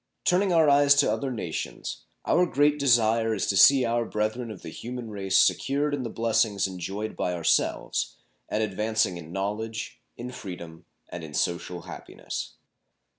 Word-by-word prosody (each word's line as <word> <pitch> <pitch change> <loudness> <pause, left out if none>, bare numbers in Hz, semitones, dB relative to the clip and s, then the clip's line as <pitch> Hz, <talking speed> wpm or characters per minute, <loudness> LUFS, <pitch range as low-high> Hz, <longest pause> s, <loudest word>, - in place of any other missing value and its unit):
Turning 185 +2 +3
our 165 -3 +5
eyes 145 0 +6
to 140 - +3
other 140 - -2
nations, 105 -10 -5 0.2
our 180 0 +3
great 145 -1 +2
desire 115 -4 +3
is 95 - -1
to 100 - 0
see 130 +6 +7
our 120 0 +1
brethren 110 +2 -2
of 105 -4 -9
the 80 - -7
human 120 +1 -7
race 95 -2 0
secured 145 +7 +2
in 145 - -1
the 120 - -4
blessings 110 -3 +1
enjoyed 95 +3 -4
by 90 - -1
ourselves, 85 -2 0 0.3
and 110 - 0
advancing 105 -2 0
in 80 -1 -10
knowledge, 105 +4 -4 0.2
in 125 +1 -6
freedom, 85 -8 -9 0.2
and 90 - -7
in 75 -2 -8
social 85 0 -2
happiness. - - -7
110 Hz, 160 wpm, -26 LUFS, 95-130 Hz, 0.3 s, see